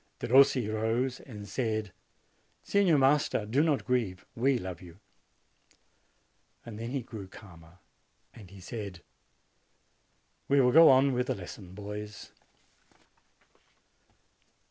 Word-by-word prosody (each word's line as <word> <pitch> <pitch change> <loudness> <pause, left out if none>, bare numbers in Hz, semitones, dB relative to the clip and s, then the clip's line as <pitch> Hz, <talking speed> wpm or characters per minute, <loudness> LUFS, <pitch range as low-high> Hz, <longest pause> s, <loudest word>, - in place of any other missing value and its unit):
Derossi 130 -2 +4
rose 115 +4 -1
and 105 -6 -10
said, 110 -1 -2 0.7
"Signor 195 -6 +3
Master, 135 -5 +2
do 125 +7 +1
not 155 -3 0
grieve. 115 -8 -1
We 130 +2 +1
love 90 -5 -7
you." 85 -1 -13 1.7
Then 110 -2 -9
he 135 -1 -3
grew 110 -4 -9
calmer, 85 -3 -15 0.6
and 105 -6 -14
said, 100 -5 -7 1.4
"We 140 0 +3
will 125 -2 +4
go 165 +3 +8
on 135 +1 +4
with 125 0 -1
the - - -1
lesson, 95 0 -10
boys." 105 +1 -8
110 Hz, 105 wpm, -29 LUFS, 100-130 Hz, 1.7 s, go